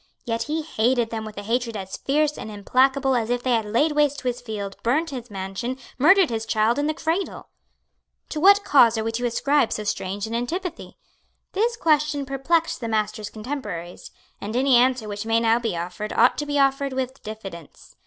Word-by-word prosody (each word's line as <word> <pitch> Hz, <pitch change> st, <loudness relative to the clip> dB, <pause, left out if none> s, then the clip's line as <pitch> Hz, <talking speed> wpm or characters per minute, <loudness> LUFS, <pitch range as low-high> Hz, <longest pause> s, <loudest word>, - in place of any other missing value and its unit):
Yet 230 Hz, -1 st, -2 dB
he 315 Hz, +1 st, -1 dB
hated 240 Hz, -4 st, +1 dB
them 220 Hz, -1 st, -4 dB
with 215 Hz, -1 st, -9 dB
a 205 Hz, -, -5 dB
hatred 230 Hz, +1 st, -1 dB
as 190 Hz, -1 st, -6 dB
fierce 300 Hz, +2 st, 0 dB
and -, -, -7 dB
implacable 265 Hz, +6 st, +2 dB
as 230 Hz, -2 st, 0 dB
if 245 Hz, 0 st, -1 dB
they 255 Hz, -, 0 dB
had 225 Hz, -2 st, +2 dB
laid 265 Hz, +9 st, +2 dB
waste 295 Hz, -1 st, +1 dB
his 250 Hz, -1 st, -2 dB
fields, 205 Hz, -4 st, -5 dB
burned 305 Hz, +7 st, +1 dB
his 245 Hz, -3 st, -7 dB
mansion, 195 Hz, +6 st, -4 dB, 0.2 s
murdered 345 Hz, +2 st, +5 dB
his 225 Hz, -1 st, -3 dB
child 220 Hz, +5 st, +2 dB
in 290 Hz, -, 0 dB
the 310 Hz, -, -1 dB
cradle. 335 Hz, +5 st, -3 dB, 0.8 s
To 305 Hz, -, -3 dB
what 400 Hz, +4 st, +6 dB
cause 240 Hz, -, +5 dB
are 220 Hz, -, -1 dB
we 225 Hz, -, -1 dB
to 240 Hz, +2 st, -1 dB
ascribe 275 Hz, +2 st, +1 dB
so 215 Hz, -, -2 dB
strange 200 Hz, 0 st, -3 dB
an 225 Hz, -, -6 dB
antipathy? 335 Hz, +11 st, -4 dB, 0.5 s
This 460 Hz, +4 st, 0 dB
question 300 Hz, -5 st, +1 dB
perplexed 315 Hz, +5 st, 0 dB
the 230 Hz, -, -3 dB
Master's 215 Hz, -1 st, -1 dB
contemporaries; 215 Hz, -8 st, -6 dB, 0.3 s
and 210 Hz, +3 st, -5 dB
any 260 Hz, +1 st, +4 dB
answer 250 Hz, -2 st, +3 dB
which 205 Hz, +1 st, -5 dB
may 225 Hz, 0 st, +3 dB
now 230 Hz, 0 st, +3 dB
be 225 Hz, -7 st, -2 dB
offered 180 Hz, +5 st, -5 dB
ought -, -, +4 dB
to 295 Hz, -, -3 dB
be 290 Hz, 0 st, -1 dB
offered 275 Hz, 0 st, +2 dB
with 260 Hz, 0 st, -3 dB
diffidence. 195 Hz, -7 st, -10 dB
245 Hz, 195 wpm, -23 LUFS, 220-290 Hz, 0.8 s, what